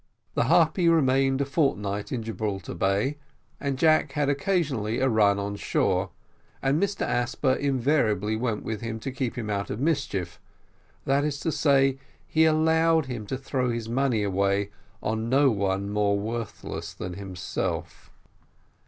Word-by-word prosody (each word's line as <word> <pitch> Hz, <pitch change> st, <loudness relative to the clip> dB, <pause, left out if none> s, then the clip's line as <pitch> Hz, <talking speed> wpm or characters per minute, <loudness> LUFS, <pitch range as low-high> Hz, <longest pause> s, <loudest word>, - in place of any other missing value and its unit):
The -, -, +1 dB
Harpy 175 Hz, -3 st, +4 dB
remained 135 Hz, -3 st, +3 dB
a -, -, +1 dB
fortnight 105 Hz, -9 st, -1 dB
in 120 Hz, -3 st, -2 dB
Gibraltar 110 Hz, -3 st, -4 dB
Bay, 100 Hz, -, 0 dB, 0.4 s
and 140 Hz, -2 st, -2 dB
Jack 155 Hz, +2 st, +3 dB
had 145 Hz, -2 st, +1 dB
occasionally 140 Hz, -, 0 dB
a 130 Hz, -, +2 dB
run 105 Hz, -4 st, +3 dB
on 100 Hz, 0 st, -3 dB
shore, -, -, 0 dB, 0.5 s
and 135 Hz, +3 st, +1 dB
Mr 200 Hz, 0 st, -1 dB
Asper 120 Hz, +2 st, 0 dB
invariably 120 Hz, -7 st, +1 dB
went 115 Hz, -2 st, -2 dB
with 110 Hz, -2 st, -4 dB
him 115 Hz, -1 st, -4 dB
to 135 Hz, -, -4 dB
keep 130 Hz, -1 st, -3 dB
him 115 Hz, -3 st, -3 dB
out 100 Hz, 0 st, -2 dB
of 105 Hz, -, -4 dB
mischief; 125 Hz, -, -1 dB, 0.7 s
that 140 Hz, +1 st, +2 dB
is 145 Hz, -2 st, -2 dB
to 165 Hz, -, 0 dB
say, 135 Hz, -3 st, +3 dB, 0.3 s
he 160 Hz, 0 st, +3 dB
allowed 160 Hz, 0 st, +3 dB
him 120 Hz, -5 st, -6 dB
to 130 Hz, -, -2 dB
throw 130 Hz, -1 st, -1 dB
his 115 Hz, -1 st, -3 dB
money 120 Hz, -3 st, +1 dB
away 100 Hz, +1 st, 0 dB, 0.3 s
on 110 Hz, +2 st, -1 dB
nobody 100 Hz, -8 st, +2 dB
more 100 Hz, 0 st, +1 dB
worthless 100 Hz, -7 st, -5 dB
than 90 Hz, 0 st, -5 dB
himself. 95 Hz, -3 st, -4 dB
120 Hz, 150 wpm, -26 LUFS, 105-140 Hz, 0.7 s, Harpy